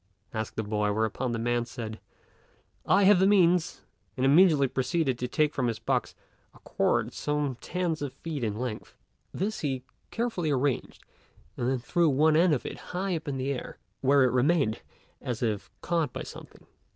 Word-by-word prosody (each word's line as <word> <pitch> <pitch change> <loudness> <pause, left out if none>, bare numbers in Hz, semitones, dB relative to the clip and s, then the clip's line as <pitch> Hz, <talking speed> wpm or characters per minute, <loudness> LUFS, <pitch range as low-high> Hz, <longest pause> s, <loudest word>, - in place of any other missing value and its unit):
asked 110 -1 -4
the 110 - -2
boy; 105 0 0
whereupon 110 +4 -1
the 115 - -1
man 120 +1 0
said, 115 -2 -7 0.9
"I 195 +2 +5
have 195 -1 +6
the 190 - +5
means," 180 -3 +3 0.4
and 130 - +1
immediately 150 -1 +5
proceeded 130 0 0
to 125 - -2
take 150 +4 +1
from 130 -3 0
his 115 - -1
box - - -1 0.4
a - - -17
cord - - 0
some 150 -3 -1
tens 175 -3 -2
of 145 -2 -3
feet 155 -4 -6
in 105 -2 -1
length. 120 -3 -5 0.4
This 210 +4 -2
he 135 -4 -2 0.3
carefully 225 -9 -2
arranged, 135 -2 -1 0.5
and 120 - -1
then 130 - +1
threw 165 +7 +1
one 155 +3 +4
end 170 +2 +5
of 125 - -5
it - - -6 0.2
high 190 -1 0
up 160 - -6
into 135 -2 -2
the 140 +1 0
air 130 - -7 0.2
where 140 +1 +5
it 125 - +3
remained 130 -2 +2 0.4
as 120 -1 -3
if 105 -3 -2
caught 165 -3 0
by - - -5
something. - - -12
135 Hz, 180 wpm, -28 LUFS, 120-165 Hz, 0.9 s, have